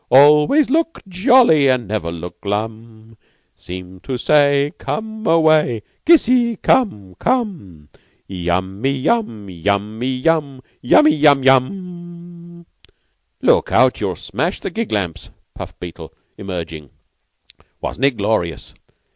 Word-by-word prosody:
Always 150 - +5
look 330 +2 0
jolly 190 - +4
and 125 -4 0
never 100 -5 -3
look 85 +1 -9
glum; 110 +2 -6 0.4
Seem 90 +1 -10
to 130 +6 -5
say 145 +1 +2
Come 220 0 -5
away. 155 -9 +3 0.2
Kissy! 250 -7 +4
come, 105 - 0
come! 175 - -3 0.4
Yummy 95 +5 -2
yum! 135 - -2
Yummy 100 +6 -2
yum! 140 -2 -1 0.2
Yummy 150 +5 +5
yum 145 -3 +4
yum!" 175 +4 -2 0.8
"Look - - +2
out. - - +3
You'll - - -2
smash - - -4
my - - -4
gig 230 0 -4
lamps," 95 -6 -3 0.2
puffed - - -10
Beetle, 85 -2 -9 0.2
emerging. 80 -7 -7 0.9
"Wasn't 135 - -2
it 135 -4 +1
glorious? 100 -5 -2
130 Hz, 110 wpm, -18 LUFS, -, 0.9 s, Always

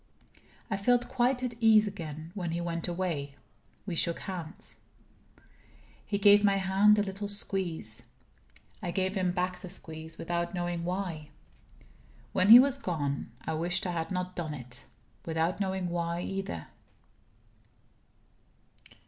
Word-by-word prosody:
I 195 - +1
felt 245 +4 +2
quite 250 0 +1
at 250 -1 -2
ease 220 -2 +6
again. 160 -5 -7
When 180 -4 -3
he 170 - -2
went 170 -1 -3
away, 170 -6 -3 0.5
we 190 - -4
shook 170 +1 +1
hands. 180 -2 -7 1.3
He 200 - -2
gave 205 0 +6
my 200 -1 +4
hand 195 +2 +4
a 205 - +3
little 200 +1 -5
squeeze. 185 - +1 0.8
I 175 - -3
gave 190 +2 -1
him 185 -3 0
back 180 0 -2
the 185 - -8
squeeze 160 -1 -2
without 170 +2 -2
knowing 175 -1 -2
why. 175 -5 -4 1.0
When 185 +2 +2
he 230 - +13
was 275 +2 +4
gone, 145 - -3
I - - -2
wished 170 +4 -1
I 180 - -1
had 165 -2 -3
not 180 -1 -3
done 160 -3 -4
it 125 -2 -10 0.4
without 165 +3 -1
knowing 190 -2 -1
why, 170 0 -2
either. 195 - -4
180 Hz, 140 wpm, -29 LUFS, 165-200 Hz, 1.3 s, he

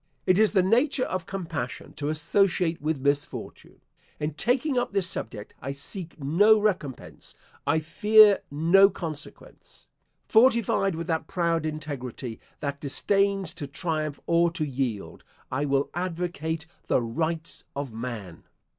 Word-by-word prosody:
It 185 +2 +4
is 215 -1 +4
the 190 -3 +4
nature 255 +7 +2
of 185 -7 -3
compassion 160 -9 -5
to 145 0 -2
associate 170 +2 +1
with 155 0 0
misfortune. 140 +1 -3 0.4
In 150 0 -2
taking 250 - +1
up 245 -4 0
this 195 -3 +2
subject 105 - -4
I 135 +1 -4
seek 165 +5 -6
no 200 +10 +5
recompense 185 - -3 0.3
I 160 -1 +2
fear 210 +5 +6
no 170 +7 +5
consequence. 165 -6 -8 0.4
Fortified 225 -5 +3
with 165 +1 -4
that 160 -2 -2
proud 170 -3 0
integrity, 135 -6 -6 0.2
that 140 0 -3
disdains 195 +4 +1
to 150 -5 -6
triumph 155 -1 -3
or 170 0 +3
to 155 -2 -1
yield, 130 -7 -3 0.3
I 135 +3 0
will 140 0 0
advocate 175 -2 -3 0.2
the - - +3
Rights 160 +7 -3
of 140 -4 -4
Man. 110 -7 -7
160 Hz, 135 wpm, -26 LUFS, 140-195 Hz, 0.4 s, fear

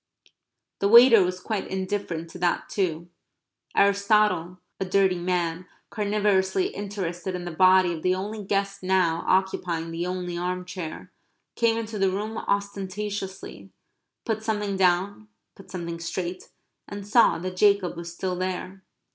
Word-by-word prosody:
The 200 - +2
waiter 235 -1 +9
was 180 0 -2
quite 205 +1 -3
indifferent 185 -4 -3
to 180 - -10
that 175 0 0
too. 170 -3 -2 0.7
Aristotle, 200 -3 +3 0.2
a 190 - -1
dirty 190 -1 +2
man, 175 0 -1 0.2
carnivorously 210 - +1
interested 190 -3 -4
in 180 -1 -5
the 175 - -4
body 185 +1 +5
of 160 - -6
the 185 +2 +2
only 205 +3 -5
guest 195 0 -1
now 185 -3 +1
occupying 180 -3 0
the 170 +2 -3
only 180 -1 -4
arm 180 +1 -3
chair, 180 -3 -7 0.4
came 230 -1 +2
into 220 -2 -4
the 195 0 +3
room 210 +4 -3
ostentatiously, 200 -1 -4 0.6
put 220 -2 -1
something 210 -2 -2
down, 190 +3 +1 0.3
put 195 - -16
something 170 -2 -5
straight, 180 +2 -5 0.4
and 205 0 -7
saw 230 +2 +5
that 185 +2 -5
Jacob 200 -3 +3
was 170 0 -7
still 180 +1 -3
there. 185 +1 -4
190 Hz, 140 wpm, -25 LUFS, 180-205 Hz, 0.7 s, waiter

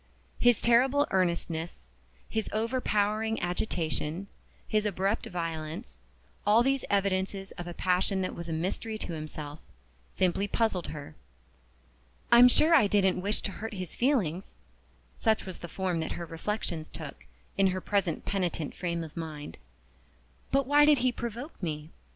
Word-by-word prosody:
His 245 -2 +4
terrible 260 +5 +5
earnestness, 170 -3 -1 0.4
his 220 -1 -2
overpowering 220 -1 0
agitation, 175 -2 -2 0.4
his 215 -1 +2
abrupt 200 +1 0
violence 160 - -5 0.4
all 215 +3 +5
these 270 +1 +1
evidences 195 -1 0
of 175 - -7
a 175 - -6
passion 185 +1 +1
that 185 - -2
was 170 0 -6
a - - -2
mystery 190 +7 -2
to 180 - -5
himself 155 -1 -6 0.5
simply 185 +2 +1
puzzled 205 -5 0
her. 145 -2 -7 1.2
"I'm 240 +1 +10
sure 310 +6 +5
I 275 -10 +7
didn't 190 -3 +3
wish 205 +3 0
to 200 - -3
hurt 220 +2 -6
his 185 -3 -5
feelings" 200 - 0 0.6
(such 220 -2 +1
was 185 -2 -6
the 175 - -6
form 180 -1 -1
that 160 - -2
her 170 - -5
reflections 165 -1 -3
took, 155 -4 -9 0.3
in 195 0 +4
her 185 0 0
present 190 -4 0
penitent 175 -6 -1
frame 170 -2 -2
of 155 -2 -10
mind); 155 -3 -6 0.9
"but 275 0 +3
why 290 +2 +6
did 295 -1 +6
he 255 - +4
provoke 240 +5 -6
me? 155 -2 -4
190 Hz, 145 wpm, -29 LUFS, 170-220 Hz, 1.2 s, I'm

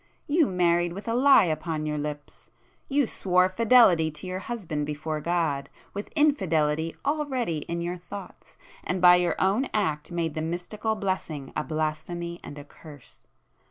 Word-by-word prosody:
You 305 0 +3
married 175 -1 +1
with 200 +5 -8
a 230 - 0
lie 270 +1 +6
upon 155 -2 -2
your 150 -1 -2
lips; 145 0 -7 0.4
you 280 0 +2
swore 180 -4 +2
fidelity 210 -6 +5
to 150 +3 -9
your 185 0 -4
husband 180 -10 -4
before 150 +1 -3
God, 165 -4 -1 0.2
with 205 +1 -5
infidelity 165 - +1
already 270 - -1
in 170 0 -3
your 175 +1 -3
thoughts, 180 +2 -11 0.3
and 185 - -2
by 180 0 +8
your 175 -1 +1
own 205 +8 +1
act 160 -7 -1
made 165 -2 -2
the 155 - -3
mystical 180 +7 -3
blessing 185 -9 -3
a - - -1
blasphemy 160 +3 -3
and 145 - -9
a 145 - -8
curse! 145 -2 -13
175 Hz, 160 wpm, -26 LUFS, 155-200 Hz, 0.4 s, by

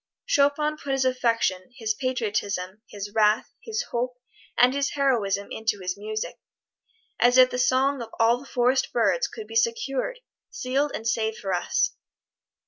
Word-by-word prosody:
Chopin 300 -7 +2
put 280 -2 -3
his 270 -1 +1
affection, 230 -7 +1
his 220 -3 0
patriotism, 210 -6 -2
his 205 0 -7
wrath, 215 0 +2
his 450 +1 -3
hope, 245 +1 -2 0.4
and 250 +1 +5
his 280 +1 -1
heroism 215 -8 +1
into 220 -1 -1
his 180 -1 -3
music 215 +1 -5 0.8
as 245 +1 +5
if 255 0 +7
the 250 - -2
song 260 +2 +2
of 230 - -6
all 230 +2 +4
the 275 - -13
forest 255 +1 +1
birds 245 - +2
could 440 - -9
be 450 - -10
secured, 460 - 0 0.3
sealed 275 +3 -1
and 225 - -4
saved 220 -1 0
for 195 -2 -3
us! 175 - +1
245 Hz, 155 wpm, -25 LUFS, 215-275 Hz, 0.8 s, if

